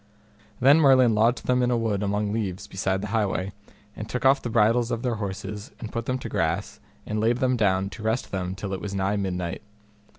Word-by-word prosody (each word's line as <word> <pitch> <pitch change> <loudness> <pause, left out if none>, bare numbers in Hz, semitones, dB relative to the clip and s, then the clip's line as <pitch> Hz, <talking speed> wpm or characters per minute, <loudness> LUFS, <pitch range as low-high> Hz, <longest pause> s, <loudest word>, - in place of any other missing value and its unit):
Then 140 +5 +6
Merlin 130 -5 +5
lodged 115 +4 +2
them 125 0 +2
in 125 - +2
a 120 - +2
wood 110 -4 -1
among 105 0 -1
leaves 100 -5 -3
beside 95 0 -2
the 105 - -5
highway, 100 -3 0 0.4
and 110 0 -7
took 125 +2 -3
off 135 +1 +5
the 120 - -4
bridles 115 +1 +3
of 120 -1 -3
their 120 -3 -1
horses 100 +1 -5
and 110 -3 -7
put 115 0 -4
them 130 - 0
to 125 - -6
grass 95 -2 -2 0.3
and 105 0 -2
laid 115 +2 +2
them 130 -1 +1
down 95 -4 +1
to 95 - -9
rest 110 +3 -1
them 95 -1 -3
till 95 +1 -5
it 95 - -4
was 100 -1 -5
nigh 95 +1 0
midnight. 90 -2 -3
105 Hz, 220 wpm, -25 LUFS, 95-120 Hz, 0.4 s, Then